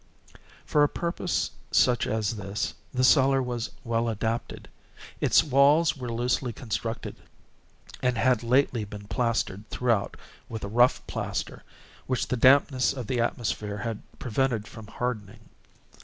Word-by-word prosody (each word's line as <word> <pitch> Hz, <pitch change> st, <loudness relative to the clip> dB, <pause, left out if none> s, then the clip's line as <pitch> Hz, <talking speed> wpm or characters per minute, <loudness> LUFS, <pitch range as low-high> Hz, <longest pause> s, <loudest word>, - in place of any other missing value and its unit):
For 150 Hz, -, +2 dB
a 145 Hz, -, +5 dB
purpose 175 Hz, +1 st, -2 dB, 0.2 s
such 125 Hz, -1 st, +3 dB
as 110 Hz, 0 st, -1 dB
this 100 Hz, +1 st, -3 dB, 0.2 s
the 130 Hz, 0 st, 0 dB
cellar 135 Hz, 0 st, +5 dB
was 120 Hz, -2 st, -3 dB
well 115 Hz, -1 st, 0 dB
adapted. 110 Hz, +1 st, -3 dB, 0.5 s
Its -, -, +4 dB
walls 150 Hz, +3 st, +4 dB
were 125 Hz, -4 st, -5 dB
loosely 120 Hz, +2 st, 0 dB
constructed, 115 Hz, -1 st, -4 dB, 0.8 s
and 125 Hz, -2 st, +1 dB
had 125 Hz, -1 st, +3 dB
lately 125 Hz, -1 st, +2 dB
been 105 Hz, 0 st, -9 dB
plastered 115 Hz, -5 st, -1 dB
throughout 115 Hz, -5 st, 0 dB, 0.3 s
with 110 Hz, -1 st, -6 dB
a -, -, -3 dB
rough 120 Hz, +4 st, +3 dB
plaster, -, -, -4 dB, 0.5 s
which 130 Hz, -1 st, -1 dB
the -, -, +1 dB
dampness 130 Hz, +1 st, +4 dB
of 130 Hz, -3 st, -5 dB
the 125 Hz, +3 st, -1 dB
atmosphere 110 Hz, -3 st, -2 dB
had 115 Hz, 0 st, -4 dB, 0.2 s
prevented 120 Hz, -3 st, -1 dB
from 110 Hz, -2 st, -11 dB
hardening. 110 Hz, -4 st, -5 dB
120 Hz, 135 wpm, -27 LUFS, 110-130 Hz, 0.8 s, a